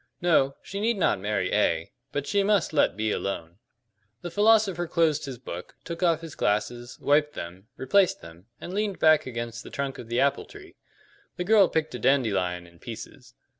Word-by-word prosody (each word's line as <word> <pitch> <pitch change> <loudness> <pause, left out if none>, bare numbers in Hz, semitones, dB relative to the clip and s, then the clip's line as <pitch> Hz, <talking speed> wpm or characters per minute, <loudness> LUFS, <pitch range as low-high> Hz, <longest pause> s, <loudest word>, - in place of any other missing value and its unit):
No, 145 -6 +3
she 200 - -6
need 225 +1 +1
not 175 - +2
marry 100 -2 -1
A; 85 -6 +1 0.2
but 145 -1 -2
she 200 +6 +1
must 200 -4 +2
let 145 - +2
B 110 0 0
alone." 90 -3 -4 0.6
The 175 - -5
philosopher 205 -4 +3
closed 160 -3 +1
his 135 -3 -6
book, 90 -8 -8
took 170 +1 -6
off 165 -3 +2
his 165 -3 -8
glasses, 120 +4 -2
wiped 150 +1 +2
them, 90 +4 -8
replaced 190 +7 +2
them, 85 +4 -14
and 180 - -7
leaned 205 -1 -1
back 155 -3 +4
against 115 -2 -5
the - - -10
trunk 140 -1 -4
of 115 - -9
the 120 +1 -1
apple 140 0 +1
tree. 400 -2 -14 0.6
The 180 - -1
girl 200 0 +5
picked 160 -1 -1
a 125 - -5
dandelion 100 -9 +1
in 85 -1 -19
pieces. - - -10
140 Hz, 185 wpm, -26 LUFS, 105-175 Hz, 0.6 s, girl